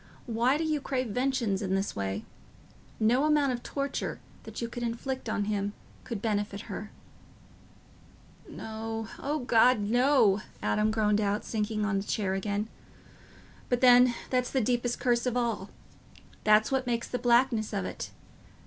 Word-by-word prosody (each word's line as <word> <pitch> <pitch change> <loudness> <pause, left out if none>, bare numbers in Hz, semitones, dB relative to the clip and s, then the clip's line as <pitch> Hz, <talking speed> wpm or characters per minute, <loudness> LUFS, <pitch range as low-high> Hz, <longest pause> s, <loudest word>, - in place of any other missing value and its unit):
Why 240 +4 +2
do 320 - -1
you 310 -2 0
crave 255 -3 -2
vengeance 245 -4 0
in 190 -2 0
this 195 +1 -1
way? 100 +1 -3 0.7
No 240 +5 +3
amount 295 -3 +3
of 245 -1 -3
torture 280 +2 -3 0.3
that - - -7
you 235 - -2
could 240 +1 -7
inflict 240 +3 -3
on 205 - 0
him 205 -1 -1 0.3
could 225 -4 -5
benefit 205 -2 -1
her." 210 - -7 1.6
"No—O 225 +6 -4
God, 245 0 +4
no," 230 -1 +3 0.2
Adam 210 +1 +1
groaned 215 -1 +2
out, 205 +1 0
sinking 215 -1 -1
on 210 -2 0
his 195 - -3
chair 195 -4 0
again; 205 +2 -1 1.0
"but 245 -1 +1
then, 250 -1 +7 0.2
that's 250 -1 +1
the 265 - +1
deepest 240 0 0
curse 240 0 +1
of 250 0 0
all... 230 -5 -1 0.7
that's 215 +2 +4
what 265 -1 0
makes 235 -1 -1
the 250 - -3
blackness 235 -2 +3
of 195 -3 -2
it... - - -5
230 Hz, 150 wpm, -29 LUFS, 210-250 Hz, 1.6 s, then